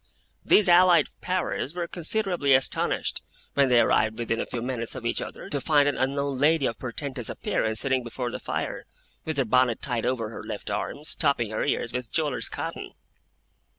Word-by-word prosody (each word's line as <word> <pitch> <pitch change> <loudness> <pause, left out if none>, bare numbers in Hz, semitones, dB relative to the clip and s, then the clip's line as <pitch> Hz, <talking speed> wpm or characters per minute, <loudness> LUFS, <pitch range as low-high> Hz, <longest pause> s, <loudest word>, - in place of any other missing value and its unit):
Those 210 - +5
allied 175 0 +6
powers 180 -4 -2
were 175 -1 -2
considerably 175 -5 +1
astonished, 130 - 0 0.3
when 140 -2 +3
they 125 -1 +5
arrived 110 -1 +2
within 115 -1 -1
a - - -4
few 120 -2 -4
minutes 120 -2 -3
of 120 - -7
each 120 - 0
other, - - -7
to 140 - -1
find 145 -1 +3
an 145 - +1
unknown 140 0 -1
lady 155 0 +3
of 115 - -2
portentous 130 -1 -4
appearance, 110 0 -1
sitting 130 -2 +1
before 120 +1 -4
the - - -5
fire, - - -4 0.4
with 160 -2 -3
her 135 - +2
bonnet 125 0 +3
tied 120 -4 -1
over 115 -4 -1
her 110 - -8
left 110 -2 -6
arm, 100 +8 -3
stopping 140 -8 0
her 110 - -1
ears 115 - -1
with 125 -2 -4
jewellers' 150 -4 -1
cotton. - - -6
130 Hz, 185 wpm, -26 LUFS, 115-150 Hz, 0.4 s, allied